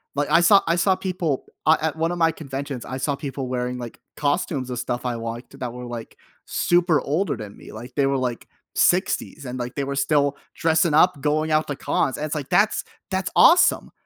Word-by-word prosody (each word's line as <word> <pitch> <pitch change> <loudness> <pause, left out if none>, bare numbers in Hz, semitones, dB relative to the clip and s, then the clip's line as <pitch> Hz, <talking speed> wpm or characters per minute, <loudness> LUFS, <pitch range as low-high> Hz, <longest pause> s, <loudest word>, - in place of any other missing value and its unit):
Like, 145 0 0
I 165 +2 +6
saw 195 +2 +6
I 170 - +3
saw 185 +2 +3
people, 180 -7 -2 0.2
uh, 160 +2 +6
at 160 -1 -1
1 165 +1 0
of 175 - -3
my 165 -1 +3
conventions, 140 -4 -6
I 130 - -5
saw 140 +2 -1
people 135 -1 -5
wearing, 125 0 -2
like, 120 -2 -8 0.2
costumes 145 -3 -1
of 125 -1 -3
stuff 120 +1 -3
I 125 - 0
liked 115 +1 -6
that 125 -2 -3
were, 125 0 -7
like, 120 -2 -8 0.3
super 175 -3 +2
older 150 +2 -1
than 105 -2 -8
me, - - -13
like, 120 +3 -10
they 140 - +2
were, 135 0 +1
like, 125 -2 -3 0.3
60s, - - +1
and, 125 0 -5
like, 120 +1 -5
they 140 - -1
were 140 0 -3
still 140 0 +2 0.2
dressing 160 -1 +2
up, 155 -1 +4
going 155 +2 0
out 155 0 +2
to 145 - -3
cons, 130 - 0
and 150 - -3
it's, 155 - -3
like, 145 -3 -5
that's 210 +2 +3 0.3
that's 190 -1 -1
awesome! 355 - +5
145 Hz, 220 wpm, -23 LUFS, 125-160 Hz, 0.3 s, I